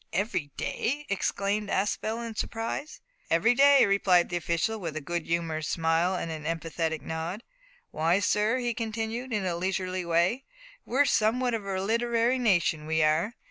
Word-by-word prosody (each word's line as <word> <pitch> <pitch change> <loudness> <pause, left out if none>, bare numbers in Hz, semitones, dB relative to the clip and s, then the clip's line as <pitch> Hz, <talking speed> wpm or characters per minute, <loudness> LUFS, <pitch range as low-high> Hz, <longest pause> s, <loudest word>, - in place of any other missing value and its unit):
every 190 -7 -1
day?" 290 +5 -2
exclaimed 200 +1 -1
Aspel 220 +4 -1
in 225 - -6
surprise. 225 +7 -4 0.3
"Every 220 +9 +4
day," 280 +1 +6
replied 190 -3 +3
the 175 - -3
official, 170 +6 -1
with 165 -5 -5
a - - -1
good 170 +3 -4
humoured 165 -2 -1
smile 165 +3 +1
and 165 -2 -3
an 155 -1 -6
emphatic 165 0 -2
nod. 165 +7 -4 0.5
"Why, 165 +3 +2
sir," 210 +4 +2
he 240 -2 -1
continued, 225 +2 -4
in 210 -4 -1
a 175 -2 -1
leisurely 185 +1 -2
way, 170 +9 +1 0.4
"we're 275 +4 +3
some 220 -1 +2
what 250 -2 0
of 215 -3 -3
a 190 -1 -1
literary 235 +4 +1
nation, 170 -9 +1
we 160 0 +2
are. 160 +10 +1
195 Hz, 165 wpm, -28 LUFS, 165-230 Hz, 0.5 s, day